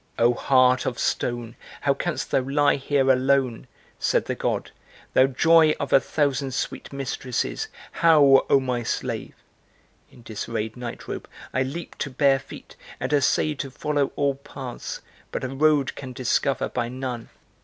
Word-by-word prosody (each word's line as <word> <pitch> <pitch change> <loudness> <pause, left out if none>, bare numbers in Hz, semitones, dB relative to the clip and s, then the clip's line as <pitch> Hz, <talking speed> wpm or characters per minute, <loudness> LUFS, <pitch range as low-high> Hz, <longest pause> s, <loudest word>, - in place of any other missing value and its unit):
'Oh 120 +1 +4
heart 130 0 +3
of 120 - -2
stone, 120 -2 -2 0.3
how - - +3
canst - - -3
thou - - +4
lie 145 +3 +2
here 135 -1 +2
alone?' 130 -2 +1 0.3
said - - +1
the - - -2
God, - - -2 0.4
'Thou 130 - +6
joy 160 +3 +5
of 140 - -3
a - - +8
thousand 140 -2 -1
sweet - - -4
mistresses, 135 - -3 0.2
how, 150 -5 +6
oh 140 - +6
my 125 -2 -2
slave?' 115 - -3 0.7
In 120 - -17
disarrayed 110 0 -4
nightrobe 120 -1 -6 0.3
I 130 - +1
leap 140 +6 -5
to 145 - -2
bare 135 +1 +3
feet - - -12 0.2
and - - -2
essay 145 +2 +2
To 135 -1 -5
follow 145 +1 -1
all 140 -1 +1
paths; 135 -2 -7 0.3
but - - -4
a 130 - -2
road 145 0 +2
can 130 -2 -8
discover 130 +2 0
by 120 -1 -2
none. 125 -2 -5
135 Hz, 155 wpm, -24 LUFS, 125-140 Hz, 0.7 s, a